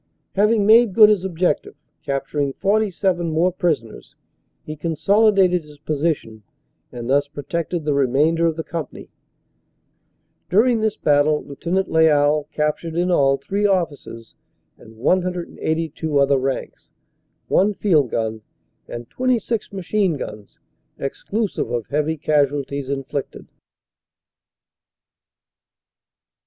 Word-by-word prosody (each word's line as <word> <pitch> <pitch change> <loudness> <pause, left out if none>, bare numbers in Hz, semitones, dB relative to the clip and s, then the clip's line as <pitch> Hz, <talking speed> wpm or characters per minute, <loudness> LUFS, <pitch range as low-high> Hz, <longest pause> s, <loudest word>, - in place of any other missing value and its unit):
Having 210 +1 +3
made 220 -2 +5
good 215 -2 +8
his 205 -4 +2
objective, 180 -4 -1 0.3
capturing 140 0 -2
47 195 -3 0
more 165 +3 +2
prisoners, 160 - -3 0.5
he 155 - -6
consolidated 185 +3 +2
his 150 -1 -16
position 145 -7 -2 0.5
and 120 -1 -7
thus 140 +2 +2
protected 155 +3 -4
the 150 - +1
remainder 145 +5 +2
of 165 - -1
the 160 - -4
company. 160 -2 -7 1.4
During 230 +5 +3
this 220 -1 0
battle 150 +1 +2
Lieut. 175 +7 -2
Lyall 150 -2 +3
captured 150 +2 -2
in 175 +1 +1
all 135 -5 +3
three 205 +6 -1
officers 150 - -3 0.4
and 110 0 -17
182 165 -1 -1
other 140 0 +3
ranks, 135 0 -4 0.6
one 205 +2 +2
field 155 - +2
gun 110 -1 -2 0.5
and 120 0 -7
26 240 -3 -1
machine 190 -3 -1
guns, 105 -6 -9 0.4
exclusive 200 +9 -3
of 120 -3 -2
heavy 150 +2 -1
casualties 140 -2 0
inflicted. 140 0 -5
160 Hz, 105 wpm, -21 LUFS, 140-185 Hz, 1.4 s, good